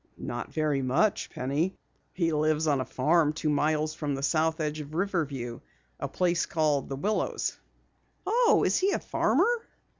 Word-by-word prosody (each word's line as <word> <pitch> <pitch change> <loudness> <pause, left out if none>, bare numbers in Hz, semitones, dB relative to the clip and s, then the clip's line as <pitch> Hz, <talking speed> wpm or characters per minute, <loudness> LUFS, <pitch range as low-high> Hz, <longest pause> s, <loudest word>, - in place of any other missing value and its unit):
"Not - - -5
very 150 -3 0
much, 135 +12 +1
Penny. 145 +9 -1 0.4
He 165 -3 0
lives 155 +1 +1
on 145 -4 +2
a - - -3
farm 150 +3 +2
two 155 -1 -1
miles 155 +1 +1
from 150 -3 -2
the 135 - -5
south 160 +2 +1
edge 155 0 -2
of 150 +1 -8
Riverview. 145 -11 -2 0.4
A - - -2
place 175 -2 0
called 150 -4 +1
The 135 - -3
Willows." 205 +10 -1 0.7
"Oh, 475 0 +4
is - - +2
he 390 +2 +2
a - - 0
farmer?" 475 -1 +1
155 Hz, 160 wpm, -28 LUFS, 145-170 Hz, 0.7 s, Oh